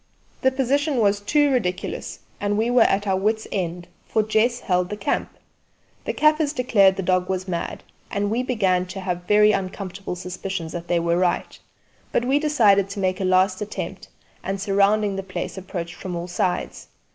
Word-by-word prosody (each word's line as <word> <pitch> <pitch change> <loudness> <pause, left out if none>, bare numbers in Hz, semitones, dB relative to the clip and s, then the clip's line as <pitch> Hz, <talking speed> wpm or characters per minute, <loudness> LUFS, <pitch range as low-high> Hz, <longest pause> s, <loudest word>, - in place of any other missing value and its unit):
The 260 - +4
position 275 +2 +1
was 205 -3 +3
too 290 +7 +2
ridiculous, 185 -9 -2 0.2
and 205 0 0
we 225 +3 +1
were 245 -1 +5
at 200 -1 +3
our 190 -2 +1
wits' 220 +3 0
end; 175 -2 -3 0.2
for 220 - +1
Jess 220 +3 +1
held 180 -2 0
the 210 - -4
camp. 200 - -1 0.8
The - - -1
kaffirs 305 -1 +3
declared 205 -8 +4
the 195 - -3
dog 185 0 +1
was 185 0 -2
mad, 175 -2 -4 0.3
and 205 0 -1
we 235 +3 +1
began 190 -8 +1
to 185 +2 -6
have 180 -2 -3
very 210 0 +6
un¬comfortable 190 -1 -4
suspicions 180 -2 -5
that 175 -1 -6
they 175 - +2
were 170 0 +1
right; 180 -1 0 0.5
but 240 - +1
we 270 +3 +3
decided 215 -11 +3
to 200 - -6
make 185 0 0
a - - 0
last 185 +1 +3
attempt, 210 0 -5 0.3
and 195 +1 -3
surrounding 200 0 +2
the - - -1
place 190 -1 -5
approached 175 -3 -6
from 180 0 -6
all 170 +1 -4
sides. 180 0 -2
195 Hz, 180 wpm, -23 LUFS, 185-220 Hz, 0.8 s, very